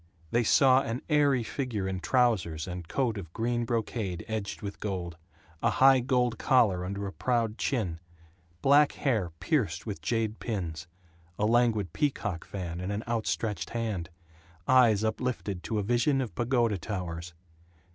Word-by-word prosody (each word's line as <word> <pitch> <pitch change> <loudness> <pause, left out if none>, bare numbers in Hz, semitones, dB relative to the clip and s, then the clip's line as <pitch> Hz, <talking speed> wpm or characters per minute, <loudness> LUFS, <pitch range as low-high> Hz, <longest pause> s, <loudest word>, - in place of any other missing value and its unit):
They 120 - +3
saw 130 +3 +5
an 115 0 -4
airy 145 -5 +3
figure 110 -5 -3
in 95 -1 -2
trousers 95 - +1
and 90 -2 -6
coat 115 -3 0
of 85 -5 -9
green 120 +1 -1
brocade 110 -6 -2
edged 110 -1 -4
with 100 -1 -6
gold; 90 -5 -4 0.5
a - - +3
high 135 0 +6
gold 125 -2 +1
collar 105 -9 +3
under 100 +2 -4
a 95 - -5
proud 115 -3 0
chin; 95 -11 -1 0.6
black 145 +1 +5
hair 110 -10 0
pierced 90 - 0
with 100 -7 -5
jade 110 +4 -1
pins; 90 -7 -4 0.5
a 105 - +1
languid 110 -6 +2
peacock 105 - -1
fan 90 -3 -5
in 90 - -3
an 105 +2 -2
out 115 -2 -2
stretched 105 -8 -2
hand; 110 -8 -3 0.6
eyes 120 -5 +5
uplifted 110 -4 -2
to 110 - -3
a 105 - 0
vision 120 +6 +2
of 125 -4 -3
pagoda 120 -4 +1
towers. 85 -3 -5
110 Hz, 155 wpm, -29 LUFS, 95-120 Hz, 0.6 s, high